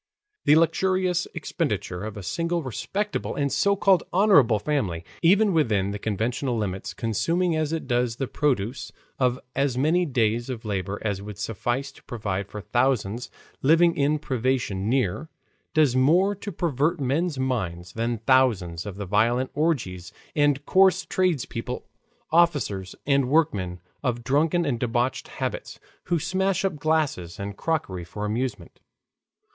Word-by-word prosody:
The 150 - +6
luxurious 180 +2 +2
expenditure 90 +2 -2
of 110 -1 -6
a 100 - -7
single 170 - -1
respectable 200 - -3
and 140 -1 0
so 200 +10 +2
called 195 -2 +4
honorable 175 - +5
family, 100 - -2 0.2
even 195 +4 +4
within 105 - +2
the 105 - -5
conventional 115 +5 -1
limits, 95 -3 -3
consuming 165 - 0
as 155 -1 0
it 165 -1 -2
does 120 -2 0
the 135 - -2
produce 130 -4 -1 0.3
of 125 -1 +2 0.2
as 135 -2 +1
many 165 +6 +2
days 120 -2 0
of 120 -2 -5
labor 100 -1 -3
as 100 -2 -1
would 105 -1 -8
suffice 120 +6 -2
to - - -19
provide 100 -5 -3
for 105 - -7
thousands 120 -1 0 0.3
living 165 +4 +4
in 145 +1 +2
privation 125 -7 -1
near, 130 - 0 0.5
does 150 -5 +4
more 170 +10 +4
to 205 +1 -7
pervert 155 -2 0
men's 145 +4 0
minds 90 -10 -2
than 115 +1 -1
thousands 105 -10 +2
of 100 - -6
the 100 0 -5
violent 115 +6 +1
orgies 120 - -1 0.2
of 145 -1 +2
coarse 190 0 +4
tradespeople, 140 -9 -1 0.5
officers, 145 - +2
and 140 -2 +2
workmen 100 - +1 0.2
of 120 -3 -1
drunken 155 +7 +2
and 125 -6 -1
debauched 120 +2 -1
habits, - - -5 0.3
who 175 - +1
smash 190 +3 0
up 185 -6 -1
glasses 150 - -1
and 100 0 -5
crockery 100 - -2
for 105 +5 -6
amusement. 110 -4 -3
130 Hz, 145 wpm, -25 LUFS, 105-160 Hz, 0.5 s, The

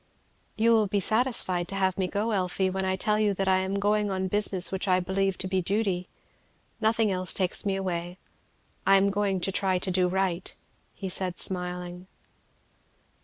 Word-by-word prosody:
"You 230 +2 +3
will 220 -2 +3
be 200 +1 0
satisfied 205 -5 +2
to 195 - -5
have 190 -1 +1
me 185 0 -1
go, 210 +4 -2
Elfie, 190 -1 0
when 190 0 -2
I 190 0 0
tell 210 +3 +1
you 210 -2 +1
that 195 0 -1
I 190 0 +3
am 190 +1 -2
going 205 +1 +1
on 190 -1 -2
business 195 -2 +1
which 190 +1 -3
I 185 -1 +3
believe 190 +1 -1
to 190 - -4
be 190 0 0
duty. 195 -1 -1 0.7
Nothing 220 -1 +1
else 185 -1 +2
takes 185 +1 +1
me 195 - 0
away. 180 -2 -4 0.7
I 195 - +5
am 195 +1 +3
going 195 -1 0
to 195 - 0
try 190 -1 +1
to 185 +1 -2
do 180 0 +2
right," 185 -1 -2 0.5
said 185 -1 -2
he - - -2
smiling. 180 0 -2
190 Hz, 185 wpm, -27 LUFS, 185-200 Hz, 0.7 s, I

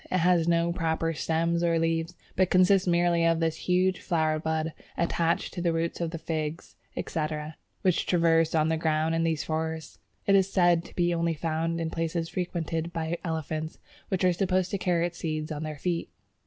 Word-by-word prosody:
It 185 - +1
has 175 -1 +3
no 170 0 +2
proper 165 -1 0
stems 165 +2 0
or 170 -1 +2
leaves, 165 +1 0 0.2
but 185 -1 +3
consists 185 +1 +4
merely 175 -1 +3
of 165 -1 +3
this 165 -1 +1
huge 185 +1 +1
flower 155 -2 0
bud 160 0 -1 0.2
attached 170 0 0
to 175 - -4
the 170 -1 +2
roots 165 +1 -2
of 165 -1 -1
Figs, 155 0 -4 0.2
etc., 155 -1 -3 0.3
which 185 -3 +2
traverse 165 -2 +3
the 160 0 +1
ground 160 0 +1
in 165 - +1
these 160 -2 0
forests. 160 -1 -3 0.3
It 200 - +3
is 195 0 +4
said 175 -3 +4
to - - -14
be 175 -1 +2
only 170 -1 0
found 165 +1 -1
in 165 -1 -2
places 165 0 -2
frequented 170 -2 -3
by 165 0 -3
elephants, 160 -1 -3 0.3
which 190 -2 -1
are 180 -1 +4
supposed 185 0 0
to 200 - -1
carry 175 -2 +1
its 175 0 -5
seeds 155 -1 -3
on 150 -1 -4
their 155 -1 -5
feet. 170 +2 -2
165 Hz, 185 wpm, -28 LUFS, 160-175 Hz, 0.3 s, consists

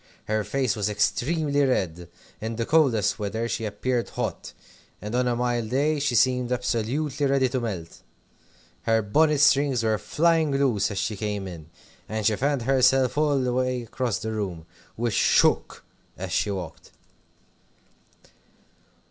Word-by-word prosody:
Her 110 0 0
face 125 +2 -1
was 105 -1 -1
extremely 145 +7 +1
red. 90 -10 -1 0.3
In 110 +1 -3
the 115 0 -2
coldest 120 -12 +2
weather 110 +3 -2
she 115 -1 -3
appeared 120 +4 -2
hot, - - -4 0.5
and 105 +2 -7
on 125 0 +1
a 120 - +1
mild 120 -2 -1
day 145 +4 +1
she 140 -4 0
seemed 125 +1 +2
absolutely 125 +4 -1
ready 135 -1 +2
to 130 - -1
melt. 95 -9 -6 0.9
Her 115 -1 +3
bonnet 150 +7 +2
strings 140 -4 +3
were 110 -2 +1
flying 165 -1 +2
loose 130 -8 +1
as 100 - -5
she 105 +2 -1
came 105 -1 -3
in, 80 -4 -10 0.4
and 110 0 -3
she 110 0 +3
fanned 140 +1 0
herself 130 0 +3
all 145 -2 +2
the 125 -1 -1
way 125 -1 -1
across 115 -2 -2
the 110 +3 -4
room, 95 -7 -4 0.3
which 115 -1 -1
shook - - +2 0.3
as 95 0 -6
she 105 +5 0
walked. 95 -5 -6
120 Hz, 150 wpm, -25 LUFS, 105-135 Hz, 0.9 s, Her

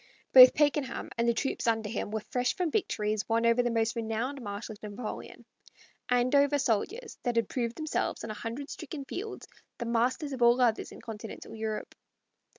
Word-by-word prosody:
Both 255 -1 +11
Pakenham 290 -3 0
and 235 0 +1
the - - +3
troops 270 - -2
under 225 -2 +1
him 210 -1 -3
were 215 0 -2
fresh 250 0 +1
from 355 -4 -1
victories 215 - -1
won 230 +1 +2
over 235 +1 +4
the 245 - 0
most 230 0 0
renowned 230 +5 -2
marshals 205 0 -6
of 210 - -6
Napoleon, 230 -4 -7 0.6
andover 280 +4 +3
soldiers 285 - -1
that 245 -2 -1
had 230 -3 +2
proved 235 -2 -2
themselves 310 -1 -2
on 225 - -4
a - - -3
hundred 230 +6 -6
stricken 290 -2 -7
fields 415 +9 -6 0.3
the 235 - -4
masters 245 +5 0
of 255 - -6
all 240 +1 +6
others 235 -3 +2
in - - -11
Continental 225 -1 -8
Europe. 220 -1 -4
235 Hz, 180 wpm, -29 LUFS, 225-270 Hz, 0.6 s, Both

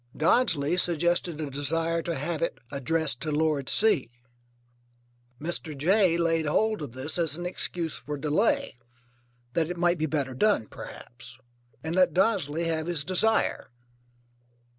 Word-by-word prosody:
Dodsley 165 - +2
suggested 175 -1 0
a 150 -3 -4
desire 165 +4 0
to 170 0 -3
have 155 +3 -3
it 170 - -1
addressed 145 -1 0
to 155 - -2
Lord 150 -3 0
C. 210 - +3 1.3
Mr. 160 -1 -3
J. 180 +3 +3
laid 165 -2 +1
hold 215 +7 +1
of 140 -6 -7
this 135 +7 +1
as 160 -2 +2
an 175 - -6
excuse 175 -2 -1
for 150 0 -6
delay, 150 - 0 0.8
that 165 -1 0
it 175 - -4
might 175 0 +2
be 155 - 0
better 140 -3 -2
done 200 - +2
perhaps, 120 +2 -11 0.5
and 160 +2 -3
let 180 -3 +3
Dodsley 180 -6 +1
have 160 -1 -2
his 170 -4 -1
desire. 205 +6 +1
165 Hz, 140 wpm, -27 LUFS, 150-175 Hz, 1.3 s, C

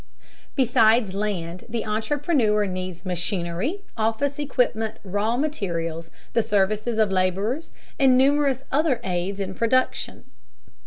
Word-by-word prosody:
Besides 225 -5 +4
land, 185 -4 -3
the 230 0 -2
entrepreneur 220 0 +1
needs 185 -2 -5
machinery, 180 - -2
office 230 +6 0
equipment, 240 -6 0
raw 205 +4 0
materials, 170 - -2 0.2
the 230 - +4
services 215 +3 0
of 215 -3 +3
laborers, 195 - 0 0.3
and 265 -2 +5
numerous 275 0 +3
other 290 -3 +2
aids 185 +2 -2
in 190 -1 -3
production. 255 +5 0
215 Hz, 110 wpm, -24 LUFS, 185-255 Hz, 0.3 s, and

